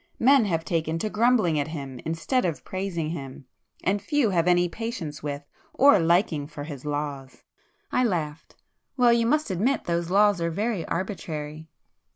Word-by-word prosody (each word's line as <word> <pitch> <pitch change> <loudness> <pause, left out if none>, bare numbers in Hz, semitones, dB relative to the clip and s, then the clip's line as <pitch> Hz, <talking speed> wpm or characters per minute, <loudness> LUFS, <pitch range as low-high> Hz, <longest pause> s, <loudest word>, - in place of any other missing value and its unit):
Men 265 -1 +5
have 165 -4 -1
taken 165 -1 -1
to 210 +5 -3
grumbling 215 -8 +3
at 145 - -1
Him 140 -5 -6
instead 165 +11 0
of 170 -4 -3
praising 185 -5 -3
Him,—and 165 +6 -5
few 245 0 +1
have 170 -2 +1
any 175 0 +4
patience 170 -7 -5
with 145 -1 -4 0.3
or 270 -7 +6
liking 165 -3 +2
for 145 -1 -8
His 145 -3 -8
laws." 145 -2 -4 0.5
I 250 - +2
laughed. 160 -8 -2 0.4
"Well, 245 -2 +5
you 230 -1 +2
must 300 -3 +1
admit 225 +10 +1
those 170 0 -1
laws 200 -1 +4
are 170 - +1
very 205 +1 -1
arbitrary!" 160 -4 -4
170 Hz, 160 wpm, -26 LUFS, 155-210 Hz, 0.5 s, or